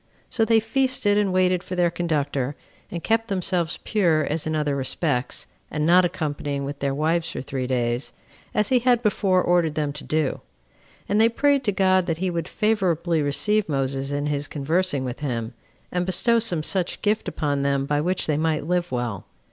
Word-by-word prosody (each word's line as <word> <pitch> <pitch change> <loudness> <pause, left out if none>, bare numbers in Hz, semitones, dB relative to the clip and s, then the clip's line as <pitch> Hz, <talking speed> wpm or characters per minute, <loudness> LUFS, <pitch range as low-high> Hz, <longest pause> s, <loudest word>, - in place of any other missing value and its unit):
So 225 - +2
they 225 0 +4
feasted 225 -2 +1
and 200 -2 +1
waited 185 -1 +2
for 185 - -6
their 175 -1 +2
conductor, 145 -5 -1 0.3
and 170 - -6
kept 225 0 +1
themselves 180 -4 -1
pure 170 -7 +2
as 155 +1 -2
in 155 - -1
other 150 -2 0
respects, 130 0 -1 0.2
and 150 0 -1
not 180 +3 +6
accompanying 145 -5 -3
with 140 0 -6
their 140 -1 -1
wives 160 +3 0
for - - -5
three 130 -1 -3
days, 120 0 -1 0.4
as 210 -1 +2
he 255 - +4
had 245 -1 +2
before 195 -3 +2
ordered 170 -3 +2
them 150 -2 -1
to 150 - -5
do. 155 -2 -1 0.7
And 205 +2 +2
they 225 - +6
prayed 280 +3 +2
to 205 - +2
God 185 -1 +2
that 165 -2 -1
he 185 +1 -1
would 170 -1 -3
favorably 180 -7 +1
receive 205 +8 +1
Moses 135 -1 -1
in 145 0 -1
his 145 -1 -1
conversing 150 -1 -1
with 125 0 -5
him, 120 -5 -3 0.4
and 180 0 0
bestow 210 +6 +2
some 180 -9 -1
such 185 +1 -1
gift 215 +1 +1
upon 145 -3 -1
them 140 0 +1
by 145 +1 0
which 180 +3 -1
they 150 -2 0
might 155 -1 0
live 175 +1 0
well. 120 -5 -3
165 Hz, 190 wpm, -24 LUFS, 145-190 Hz, 0.7 s, not